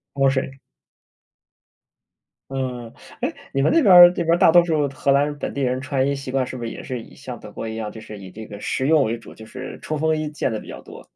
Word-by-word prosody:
防 135 -1 +3
水。 135 0 -1 2.0
嗯， 125 -3 -4 0.3
哎， - - -1 0.2
你 135 - +1
们 140 - +3
那 330 - +4
边 200 -9 +6
儿 175 0 +12
那 175 - -2
边 165 - +2
儿 170 - +4
大 180 -2 +6
多 175 +1 +7
数 155 -4 +1
荷 140 +1 -3
兰 145 +1 +1
本 - - -4
地 140 - -3
人 130 -1 0
穿 130 0 -1
衣 140 - +1
习 135 -2 -6
惯 135 -1 +1
是 130 - -7
不 120 - -5
是 - - -3
也 - - -8
是 125 -2 -5
以 - - -15
像 125 -4 -8
德 - - -11
国 105 - -7
一 110 0 -5
样， 110 -2 -4
就 110 - -10
是 105 - -10
以 95 -1 -10
这 110 +4 -10
个 105 -1 -10
实 130 +5 -2
用 155 -2 +5
为 115 +2 -2
主， 115 - -13
就 110 - -12
是 - - -8
冲 155 - -3
锋 160 +1 +1
衣 155 -1 -3
见 150 -4 -2
得 110 - -3
比 - - -13
较 - - -9
多？ - - -12
135 Hz, 290 characters per minute, -22 LUFS, 115-150 Hz, 2.0 s, 儿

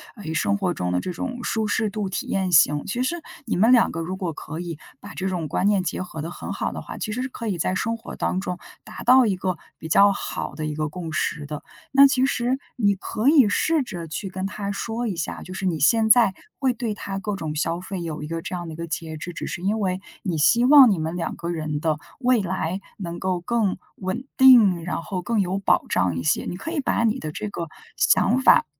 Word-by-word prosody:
呃， 210 - -11
以 160 - -3
生 200 +5 +1
活 185 -3 0
中 90 0 -2
的 90 - +1
这 180 - -4
种 245 +6 -5
舒 220 -1 -1
适 220 0 0
度 205 0 -3
体 190 - -4
验 190 -2 0
型。 150 -2 +5
其 245 +5 -1
实 340 +7 -1 0.3
你 - - -1
们 220 +6 +5
两 240 - +5
个 165 - -5
如 175 +3 -3
果 185 -3 -3
可 155 +1 -7
以 170 -3 -5 0.2
把 - - -10
这 190 - -3
种 180 -4 -2
观 195 - +1
念 200 -3 +3
结 180 - -3
合 180 -4 -6
得 165 +3 -5
很 - - -6
好 - - -2
的 - - -6
话， - - -8
其 215 - -3
实 245 - -2
是 260 - -2
可 235 -3 -7
以 185 - -1
在 185 +3 0
生 230 +4 -1
活 225 - -9
当 185 - -1
中 180 -2 -4 0.3
达 - - -9
到 255 +1 +6
一 200 -4 +1
个 185 -2 -2 0.2
比 160 - -8
较 200 +5 +6
好 - - -5
的 155 - -4
一 150 - -2
个 155 0 -2
共 165 0 -6
识 155 -1 -2
的。 150 0 -6 0.3
那 275 +1 +8
其 260 -1 +2
实 255 -1 0 0.2
你 205 -4 +3
可 215 +4 -3
以 275 -8 +6
试 315 +7 +2
着 175 -9 -7
去 175 +5 -5
跟 185 +1 -4
他 200 0 -4
说 230 +4 -3
一 210 - -1
下， 165 - -4
就 185 - -9
是 190 - -4
你 170 -4 0
现 220 +9 +4
在 225 -4 +6 0.3
会 260 -3 +2
对 230 -2 -3
他 195 -1 -5
各 205 +1 -3
种 155 -5 -4
消 165 +3 -1
费 185 0 -5
有 160 -3 -5
一 - - -5
个 165 +1 -4
这 180 - -5
样 175 -1 -5
的 160 - -7
一 - - -8
个 170 - -4
节 160 0 -4
制， 175 +3 -7
只 - - -5
是 175 - -5
因 205 +4 0
为 185 -2 -1 0.2
你 175 -5 -1
希 235 +11 +4
望 275 -2 +9
你 185 - 0
们 160 +2 -3
两 175 - -3
个 170 0 -5
人 155 -3 -2
的 155 -1 0 0.2
未 250 -3 +3
来 185 -1 -2 0.2
能 170 -3 -5
够 185 -1 -1
更 215 0 0 0.2
稳 190 +7 -4
定， 230 -10 +7
然 165 -1 -3
后 185 +1 -4
更 225 +4 0
有 190 0 -1
保 195 - +2
障 90 -2 +1
一 85 - -3
些， 75 - +1
你 - - -4
可 320 - -6
以 335 - -1
把 265 - +1
你 230 +3 +1
的 155 - -5
这 210 +6 -5
个 170 -4 -5 0.3
想 240 +5 +3
法 - - +6
190 Hz, 275 characters per minute, -24 LUFS, 165-225 Hz, 0.3 s, 望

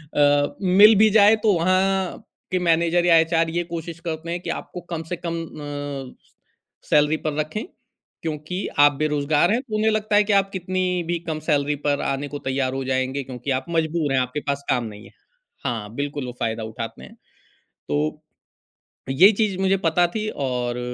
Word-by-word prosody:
अ, 145 0 +3
मिल 200 +4 +7
भी 215 +2 +5
जाए 210 +1 +6
तो 210 -3 +4
वहाँ 185 +2 +1 0.3
के 185 - +1
मैनेजर 170 +1 +3
या 170 -1 +6
एचआर 165 0 +2
ये 175 +1 -1
कोशिश 165 0 -5
करते 160 +1 -4
हैं 175 - -2
कि - - -6
आपको 180 - -5
कम 165 0 -3
से - - 0
कम 165 0 -2
अ, 145 -3 -6
स - - -31 0.6
सैलरी 150 +1 +4
पर 155 -1 -3
रखें 155 +8 -3 0.6
क्योंकि 155 +2 -4 0.2
आप 145 0 +7
बेरोज़गार 150 +3 +2
हैं। 240 +3 +1
तो 230 -6 -6
उन्हें 215 +1 +2
लगता 215 -1 0
है 210 - +6
कि 205 0 0
आप 195 0 +3
कितनी 185 0 -2 0.3
भी 175 0 0
कम 155 -1 -2
सैलरी 145 -1 +1
पर 145 -1 +1
आने 140 +1 -2
को 145 0 -6
तैयार 130 -1 0
हो 135 0 -3
जाएँगे 130 +1 -1
क्योंकि 130 +1 -5
आप 130 0 -1
मजबूर 160 -3 0
हैं, 130 - +3
आपके 125 +3 -2
पास 140 0 -1
काम 125 -2 +2
नहीं 105 0 -9
है। - - -15 0.5
हाँ, 110 -5 -3
बिल्कुल 145 -1 -3
वो 125 - -5
फ़ायदा 110 0 -2
उठाते 115 +1 -7
हैं। - - -13 0.7
तो 75 +1 -1 0.9
ये 180 +10 +7
चीज़ 200 -3 0
मुझे 195 0 +3
पता 175 +2 +3
थी 215 0 -2 0.2
और 125 -1 -2
155 Hz, 190 wpm, -23 LUFS, 140-185 Hz, 0.9 s, मिल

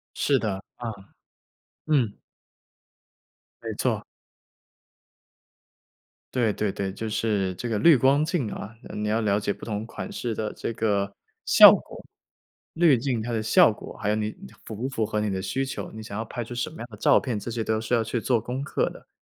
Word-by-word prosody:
是 140 -2 +2
的， 100 -4 -2
啊， 120 - -6 1.0
嗯。 130 -9 +1 1.4
没 - - -4
错。 - - 0 2.3
对 120 -4 +2
对 105 -1 -1
对， 95 0 -3
就 110 +3 -5
是 105 -3 0
这 120 - -4
个 110 -2 0
滤 165 +4 +7
光 135 +4 +4
镜 155 - -1
啊， 110 +3 -7 0.2
你 105 0 -2
要 110 +2 +1
了 105 -2 +2
解 100 -1 -1
不 - - -11
同 105 -1 -3
款 115 - -7
式 120 -2 -3
的 105 0 -2
这 115 - -4
个 100 -3 0 0.3
效 - - +10
果 - - -5 0.7
滤 165 -5 +5
镜 120 -1 -1
它 120 +2 -4
的 115 -2 0
效 110 +1 +6
果。 105 - -10
还 105 - -2
有 105 - +2
你 110 0 -2 0.3
符 110 - -6
不 125 +6 -3
符 115 -5 -1
合 105 0 -2
你 105 - 0
的 95 -1 -2
需 135 +7 -1
求， 135 - -5
你 110 0 -8
想 100 -1 -6
要 110 - -3
拍 120 +2 -5
出 115 - -8
什 120 +4 -2
么 155 - -13
样 115 - -6
的 105 - -10
照 - - +5
片， 120 -6 -3
这 110 - -6
些 115 -1 -2
都 110 0 0
是 110 +2 -3
要 115 -2 +3
去 115 +2 -2
做 120 0 +1
功 125 +4 -4
课 - - 0
的。 - - -14
110 Hz, 210 characters per minute, -26 LUFS, 105-125 Hz, 2.3 s, 效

